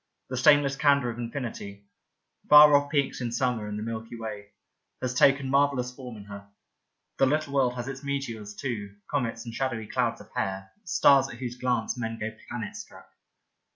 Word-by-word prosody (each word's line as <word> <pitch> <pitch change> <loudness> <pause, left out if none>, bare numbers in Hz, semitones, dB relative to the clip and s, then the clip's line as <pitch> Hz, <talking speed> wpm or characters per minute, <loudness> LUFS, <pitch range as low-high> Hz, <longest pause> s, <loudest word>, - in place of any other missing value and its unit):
The 130 - -2
stainless 140 +2 +5
candour 140 -4 +3
of 115 - -9
infinity 115 -5 -6 0.3
— - - -38
far 150 0 +9
off 145 0 +2
peaks 140 -3 0
in 120 -1 -2
summer 120 -3 -1
and 105 0 -4
the 105 - -4
Milky 115 +1 -6
Way 105 -3 -7 0.3
— - - -53
^has 125 0 -2
taken 135 +1 +4
marvellous 135 -2 +1
form 125 -4 -9
in 100 - -10
her. 100 0 -10 0.7
The 135 - +5
Little 150 0 0
World 130 -3 +2
has 120 0 -5
its 135 +1 -6
meteors, 115 -7 -4
too, 105 -7 -5 0.2
comets 120 -4 -2
and 115 - -7
shadowy 120 -4 -2
clouds - - -1
of - - -15
hair, 95 0 -3
stars 140 -5 +4
at - - -8
whose 120 0 -5
glance 125 -1 -1
men 115 -1 -3
go 110 0 -4 0.2
planet - - -5
struck. - - -11
125 Hz, 190 wpm, -27 LUFS, 110-140 Hz, 0.7 s, far